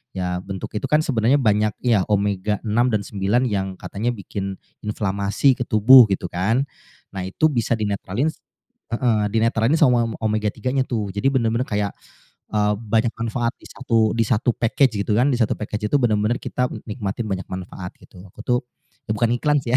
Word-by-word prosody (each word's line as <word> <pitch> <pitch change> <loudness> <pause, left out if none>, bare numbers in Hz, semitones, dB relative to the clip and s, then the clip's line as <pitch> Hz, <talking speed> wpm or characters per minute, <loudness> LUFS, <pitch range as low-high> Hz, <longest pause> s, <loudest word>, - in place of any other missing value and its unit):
Ya 90 -1 -2
bentuk 95 -1 -6
itu - - -3
kan 150 +1 +4
sebenarnya 125 -1 +2
banyak 105 -2 +2
ya, 115 -6 +3
omega-6 105 +1 0 0.2
dan 105 - +2
9 100 +5 0
yang 95 -2 -1
katanya 115 +5 -2
bikin 100 -1 -5 0.3
inflamasi 105 +4 +1
ke - - -1
tubuh 120 +3 +8
gitu 95 -2 -1
kan. 110 +9 +1 0.5
Nah 90 - -3
itu 155 +12 +2
bisa 120 -4 0
dinetralin 105 +5 -1 0.6
heeh, 115 -3 +2
dinetralin 115 +3 +2
sama 125 -5 +4
m - - -5
omega-3 110 +2 -1
nya 135 - +3
tuh. 110 -5 -2
Jadi 100 +6 0
bener-bener 115 -1 +1
kayak, 105 -1 -1 0.6
eee, 105 -1 +2
banyak 115 +1 0
manfaat 115 +1 -1
di - - -14
satu 115 -4 +1
di 115 - +3
satu 120 +2 +2
package 115 -2 +2
gitu 105 - -1
kan, 125 +4 +4
di - - +1
satu 110 - +2
package 105 0 -3
itu - - +6
bener-bener 110 +1 +1
kita 125 0 -1 0.2
nikmatin 105 0 -4
banyak 95 0 -2
manfaat 90 0 -6
gitu. 90 - -15
Aku - - -14
tuh 125 -1 +2 0.5
bukan 115 +2 +1
iklan 145 +4 +2
sih 120 0 -2
ya, - - +8
110 Hz, 175 wpm, -22 LUFS, 100-120 Hz, 0.6 s, tubuh